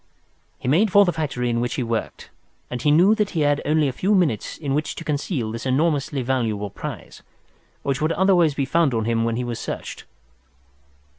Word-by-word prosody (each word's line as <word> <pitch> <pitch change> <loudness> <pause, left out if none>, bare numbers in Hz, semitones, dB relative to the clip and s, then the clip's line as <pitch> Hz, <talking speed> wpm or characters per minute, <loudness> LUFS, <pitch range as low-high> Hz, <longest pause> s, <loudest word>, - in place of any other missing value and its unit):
He - - -7
made 185 +10 +3
for 205 +1 +6
the 175 - 0
factory 140 -6 -2
in 115 - 0
which 120 0 -2
he 130 - -1
worked, 115 -1 -4 0.4
and 125 -1 -4
he 150 - +2
knew 175 +8 +5
that 210 -2 0
he 165 - -2
had 145 0 +2
only 150 0 +2
a - - 0
few 200 +8 +1
minutes 155 - 0
in 140 -4 -3
which 150 +1 -1
to - - -7
conceal 145 - -2
this 115 +1 -6
enormously 140 0 0
valuable 110 -6 -1
prize, - - -8 0.6
which 140 0 -1
would 155 +1 +1
otherwise 175 -5 +3
be 140 - 0
found 155 -2 +2
on 110 -1 0
him 115 0 +1
when 115 -1 0
he 125 - -2
was 120 -2 -4
searched. - - -6
140 Hz, 205 wpm, -22 LUFS, 120-165 Hz, 0.6 s, for